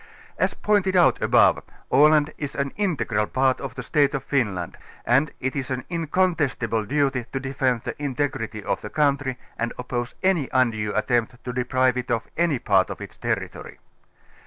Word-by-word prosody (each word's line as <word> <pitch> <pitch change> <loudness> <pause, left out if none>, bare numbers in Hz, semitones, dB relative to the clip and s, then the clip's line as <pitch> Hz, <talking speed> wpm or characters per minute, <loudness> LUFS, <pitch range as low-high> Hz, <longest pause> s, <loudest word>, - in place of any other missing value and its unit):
As - - +1
pointed 200 -3 +1
out 175 - +4
above, - - +4 0.3
Aland 150 +1 +5
is 145 -2 -4
an 140 0 -1
integral 140 - 0
part 130 0 +1
of 135 -2 -6
the - - -5
State 145 -2 +2
of 135 - -3
Finland 105 - -1 0.3
and 135 +5 +3
it 130 0 -2
is 135 -1 -3
an 130 -1 -3
incontestible 155 - 0
duty 135 0 0
to 135 - -2
defend 130 -3 -1
the - - -4
integrity 130 -6 -2
of - - -2
the 105 - -6
country 140 -2 +1 0.2
and 115 0 -1
oppose 120 -1 -4
any 180 -8 +2
undue 115 -5 +1
attempt 120 +2 0
to 125 - -4
deprive 125 0 +1
it 125 0 -4
of 115 -2 0
any 170 -4 +2
part - - +2
of - - -6
its - - -9
territory. - - -4
130 Hz, 170 wpm, -24 LUFS, 120-145 Hz, 0.3 s, Aland